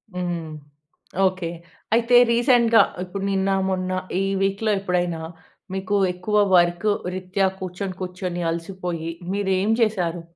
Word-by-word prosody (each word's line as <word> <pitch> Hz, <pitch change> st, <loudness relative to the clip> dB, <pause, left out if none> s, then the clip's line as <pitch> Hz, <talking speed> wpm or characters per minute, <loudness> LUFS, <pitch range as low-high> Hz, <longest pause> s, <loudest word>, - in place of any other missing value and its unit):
హ్మ్. 175 Hz, -3 st, -3 dB, 0.8 s
ఓకె. 185 Hz, -2 st, -1 dB, 0.5 s
అయితే 235 Hz, +1 st, +3 dB, 0.2 s
రీసెంట్‌గా 235 Hz, -1 st, +5 dB, 0.2 s
ఇప్పుడు 190 Hz, +2 st, -6 dB
నిన్న, 195 Hz, 0 st, +1 dB, 0.2 s
మొన్న 185 Hz, -1 st, -1 dB, 0.3 s
ఈ -, -, +1 dB, 0.2 s
వీక్‌లో 195 Hz, +3 st, +1 dB
ఎప్పుడైనా, 175 Hz, -3 st, -1 dB, 0.5 s
మీకు 190 Hz, +1 st, -1 dB, 0.2 s
ఎక్కువ 180 Hz, +4 st, -3 dB, 0.2 s
వర్కు 175 Hz, +4 st, +3 dB, 0.2 s
రీత్యా, 190 Hz, +1 st, 0 dB
కూర్చొని, 185 Hz, +1 st, -5 dB
కూర్చొని 180 Hz, -1 st, -4 dB
అలసిపోయి 170 Hz, -1 st, -4 dB, 0.2 s
మీరేం 195 Hz, +1 st, +1 dB
చేశారు? 180 Hz, -6 st, 0 dB
185 Hz, 110 wpm, -23 LUFS, 175-200 Hz, 0.8 s, రీసెంట్‌గా